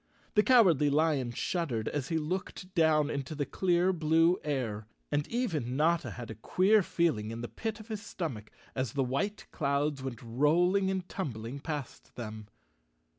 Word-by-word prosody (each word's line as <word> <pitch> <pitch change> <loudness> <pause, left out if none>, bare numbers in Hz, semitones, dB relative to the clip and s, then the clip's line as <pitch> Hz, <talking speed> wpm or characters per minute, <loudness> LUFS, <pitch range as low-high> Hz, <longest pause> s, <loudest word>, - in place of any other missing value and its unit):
The 210 - +6
Cowardly 185 - +5
Lion 145 -4 +2
shuddered 120 -3 -2
as 140 -3 -2
he 165 - 0
looked 180 +3 -4
down 155 -3 +3
into 140 +2 -4
the 145 -1 -1
clear 180 +2 +2
blue 165 +2 +3
air, 115 -8 -2 0.2
and 145 0 0
even 160 - -1
Notta 160 -3 +2
had 115 +2 -7
a 110 0 -11
queer 205 - +4
feeling 160 - 0
in 115 +1 -5
the 120 - -4
pit 220 - -4
of 215 - -11
his 215 -2 -4
stomach 145 - -5 0.2
as 130 -4 -2
the 140 - +1
white 195 +12 -2
clouds 140 -1 0
went 130 -4 -6
rolling 170 +11 +3
and 190 -1 -2
tumbling 125 - -5
past 145 -3 -6
them. 110 -3 -7
150 Hz, 165 wpm, -31 LUFS, 125-180 Hz, 0.2 s, The